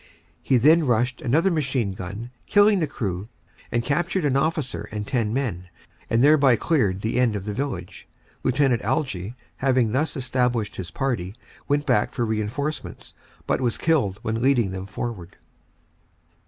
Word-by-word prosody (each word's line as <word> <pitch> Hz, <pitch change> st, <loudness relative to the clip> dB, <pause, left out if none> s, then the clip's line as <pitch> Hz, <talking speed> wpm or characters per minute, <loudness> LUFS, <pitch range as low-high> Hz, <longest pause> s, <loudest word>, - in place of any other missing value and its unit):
He 130 Hz, -, +3 dB
then 155 Hz, +5 st, +5 dB
rushed 125 Hz, +1 st, +1 dB
another 160 Hz, +10 st, +2 dB
machine 135 Hz, -, 0 dB
gun, 100 Hz, +6 st, -7 dB, 0.2 s
killed 205 Hz, -1 st, +5 dB
the 160 Hz, -, 0 dB
crew 100 Hz, -5 st, -4 dB, 0.4 s
and 120 Hz, 0 st, 0 dB
captured 170 Hz, +4 st, 0 dB
an 135 Hz, -2 st, +2 dB
officer 135 Hz, -7 st, -1 dB
and 105 Hz, -1 st, -4 dB
10 115 Hz, -2 st, 0 dB
men, 110 Hz, -9 st, -2 dB, 0.4 s
and 115 Hz, +2 st, +3 dB
thereby 140 Hz, -4 st, +6 dB
cleared 105 Hz, -, +1 dB
the 110 Hz, +3 st, -1 dB
end 120 Hz, -4 st, +2 dB
of 100 Hz, -2 st, -4 dB
the 105 Hz, -, -3 dB
village. 100 Hz, -9 st, -5 dB, 0.4 s
Lieut. 130 Hz, -3 st, +2 dB
Algie, 115 Hz, -, -2 dB, 0.2 s
having 130 Hz, -4 st, +2 dB
thus 145 Hz, +7 st, 0 dB
established 125 Hz, -4 st, 0 dB
his 90 Hz, -2 st, -5 dB
party, 115 Hz, -8 st, -2 dB, 0.3 s
went 145 Hz, +1 st, +1 dB
back 105 Hz, -, +2 dB
for 120 Hz, -, 0 dB
reinforcements, 110 Hz, +8 st, -3 dB, 0.3 s
but -, -, 0 dB
was 120 Hz, -3 st, 0 dB
killed 135 Hz, -, +1 dB
when 110 Hz, +1 st, -2 dB
leading 125 Hz, -6 st, +3 dB
them 95 Hz, 0 st, -6 dB
forward. 105 Hz, -4 st, -6 dB
125 Hz, 155 wpm, -24 LUFS, 105-140 Hz, 0.4 s, thereby